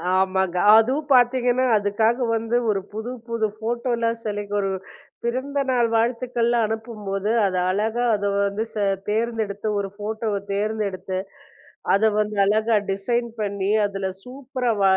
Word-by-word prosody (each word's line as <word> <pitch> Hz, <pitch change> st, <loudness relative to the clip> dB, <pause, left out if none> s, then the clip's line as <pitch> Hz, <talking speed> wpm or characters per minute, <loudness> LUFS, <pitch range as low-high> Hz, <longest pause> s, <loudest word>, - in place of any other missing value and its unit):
ஆமாங்க. 190 Hz, -1 st, +1 dB, 0.2 s
அதுவும் 265 Hz, +7 st, +2 dB
பாத்தீங்கன்னா, 250 Hz, 0 st, +3 dB
அதுக்காக 220 Hz, +4 st, +1 dB
வந்து 225 Hz, +1 st, -1 dB
ஒரு 200 Hz, -2 st, +1 dB
புதுப்புது 230 Hz, 0 st, -3 dB
போட்டோல்லாம் 235 Hz, 0 st, -1 dB
செலக்ட் 205 Hz, -1 st, -3 dB
ஒரு 195 Hz, -1 st, 0 dB, 0.5 s
பிறந்தநாள் 260 Hz, 0 st, 0 dB
வாழ்த்துக்கள்லாம் 235 Hz, 0 st, +1 dB
அனுப்பும்போது, 210 Hz, -3 st, -4 dB, 0.2 s
அதை 185 Hz, -2 st, 0 dB
அழகா 220 Hz, +5 st, 0 dB
அதை 205 Hz, 0 st, -1 dB
வந்து 200 Hz, +2 st, 0 dB
ச -, -, -21 dB, 0.3 s
தேர்ந்தெடுத்து, 220 Hz, -2 st, -1 dB
ஒரு 200 Hz, -1 st, -3 dB
போட்டோவ 215 Hz, 0 st, -2 dB, 0.2 s
தேர்ந்தெடுத்து, 200 Hz, -2 st, -2 dB, 0.8 s
அதை 215 Hz, +3 st, +4 dB
வந்து 210 Hz, 0 st, -1 dB
அழகா 220 Hz, +3 st, +2 dB, 0.2 s
டிசைன் 235 Hz, +5 st, -1 dB
பண்ணி, 200 Hz, -1 st, -1 dB
அதுல 195 Hz, -1 st, -3 dB
சூப்பரா 255 Hz, -1 st, -3 dB
வ -, -, +3 dB
220 Hz, 120 wpm, -23 LUFS, 200-240 Hz, 0.8 s, அதை